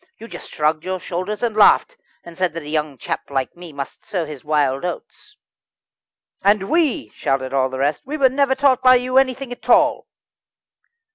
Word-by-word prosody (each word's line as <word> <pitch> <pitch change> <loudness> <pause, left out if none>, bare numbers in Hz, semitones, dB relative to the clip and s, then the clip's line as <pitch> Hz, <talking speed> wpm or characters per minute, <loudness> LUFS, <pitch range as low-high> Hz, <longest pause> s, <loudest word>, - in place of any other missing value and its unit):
You 230 - -11
just - - -10
shrugged 155 +1 0
your 185 0 -3
shoulders 185 +6 -4
and 230 -3 -1
laughed, 215 - +5 0.3
and 170 -1 -12
said 180 -3 -1
that 165 - -5
a - - -11
young 150 -3 -2
chap - - -5
like 135 -2 -2
me 175 -1 -11
must 140 -2 -7
sow 180 -5 -3
his 150 -4 -9
wild 145 -3 0
oats." 420 - -7 1.1
"And 200 -1 +2
we," 310 - +1
shouted 130 +3 -2
the 130 -1 0
rest 145 +3 0
"we 295 +3 -5
were 275 -3 +5
never 270 0 +1
taught 265 -2 +3
by 255 0 +7
you 255 +1 +3
anything 265 -1 -1
at 245 - -10
all." - - +3
180 Hz, 185 wpm, -20 LUFS, -, 1.1 s, by